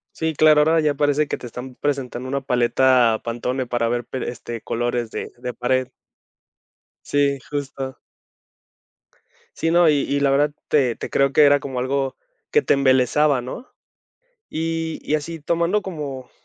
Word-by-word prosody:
Sí, 160 -1 -1
claro, 155 0 +5
ahora 160 +2 +3
ya 150 -2 +1
parece 145 +1 +1
que - - -2
te - - -10
están 125 +2 -8
presentando 130 -3 -3
una 140 +1 -1
paleta 125 -2 +3
Pantone 125 +2 -3
para 120 -1 0
ver, 120 +1 -1
per 130 +2 -5
este, 120 -1 -6
colores 120 0 -2
de - - -5
de 125 0 -5
pared. 130 +2 0 1.2
Sí, 140 -1 +1
justo. 135 -2 -4 1.6
Sí, 165 - 0
no, 170 0 +5
y - - +5
y 140 +1 -1
la 140 -1 +3
verdad 145 +2 +2 0.2
te 130 -6 +2
te - - -6
creo 140 0 +2
que 150 - +5
era 145 0 +5
como 135 -2 -5
algo 135 +1 -1 0.3
que 450 - +3
te - - +3
embelesaba, 135 +1 +3
¿no?, 130 - -8 0.8
y 165 0 -3
y 150 - -1
así 160 +2 -6
tomando 170 +6 0
como 145 -9 -6
140 Hz, 160 wpm, -22 LUFS, 125-150 Hz, 1.6 s, claro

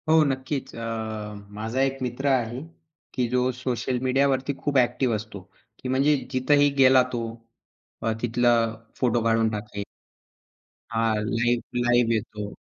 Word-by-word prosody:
हो, 160 0 +6
नक्कीच. 135 0 -3
अ, - - -7 0.8
माझा 115 +5 -1
एक 135 0 +1
मित्र 125 +2 -2
आहे, 125 -2 +1 0.5
की 125 -1 0
जो 125 +1 +1
सोशल 125 0 -2
मीडियावरती 135 +1 +2
खूप 145 -1 0
ॲक्टिव्ह 125 -1 +1
असतो, 105 -1 -6 0.4
की 130 - -5
म्हणजे 135 +3 +3 0.2
जिथेही 145 +3 +4
गेला 130 -1 +7
तो, 120 -1 -1 0.8
अ, 115 - +1
तिथला 120 0 +3 0.5
फोटो 120 -2 +2
काढून 115 -1 +3
टाकेल. 105 -1 -5 1.1
हां, 115 -1 +1
लाईव्ह, 120 +2 0
लाईव्ह 120 -1 +3
येतो. 105 -2 -4
125 Hz, 135 wpm, -25 LUFS, 115-130 Hz, 1.1 s, गेला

